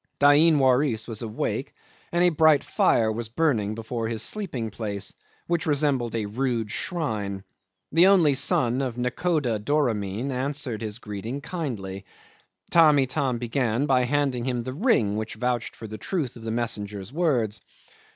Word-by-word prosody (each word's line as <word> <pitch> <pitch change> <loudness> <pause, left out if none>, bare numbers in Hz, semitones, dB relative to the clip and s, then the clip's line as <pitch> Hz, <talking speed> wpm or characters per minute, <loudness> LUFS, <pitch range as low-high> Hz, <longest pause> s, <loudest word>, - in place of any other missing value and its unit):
Dain 150 +3 +6
Waris 130 -3 +2
was 115 -1 -4
awake, 110 -2 -3 0.4
and 175 +1 +2
a 180 - +6
bright 160 -2 +4
fire 110 -1 +2
was 115 0 -4
burning 115 -6 0
before 115 0 -4
his 115 -1 -1
sleeping 135 - -3
place, 100 -2 -4 0.3
which 170 -2 -1
resembled 140 -6 +1
a 110 -2 -1
rude 115 0 -2
shrine. 105 - -2 0.5
The 170 +4 +6
only 175 -7 +5
son 130 -1 +1
of 125 -3 -3
nakhoda 125 -2 0
Doramin 115 -2 -1
answered 130 -3 -2
his 110 -1 -4
greeting 110 +3 -6
kindly. 115 - -5 0.7
Tamb' 155 -3 +6
Itam 130 -1 0
began 120 +1 0
by 130 -3 +3
handing 135 -2 0
him 125 -2 -1
the 130 - -5
ring 135 - +2
which 110 0 -4
vouched 125 -2 -2
for - - -9
the 110 0 -7
truth 155 - -2
of 115 - -11
the 115 - -5
messenger's 105 -2 -3
words. 130 - 0
125 Hz, 150 wpm, -25 LUFS, 110-145 Hz, 0.7 s, Dain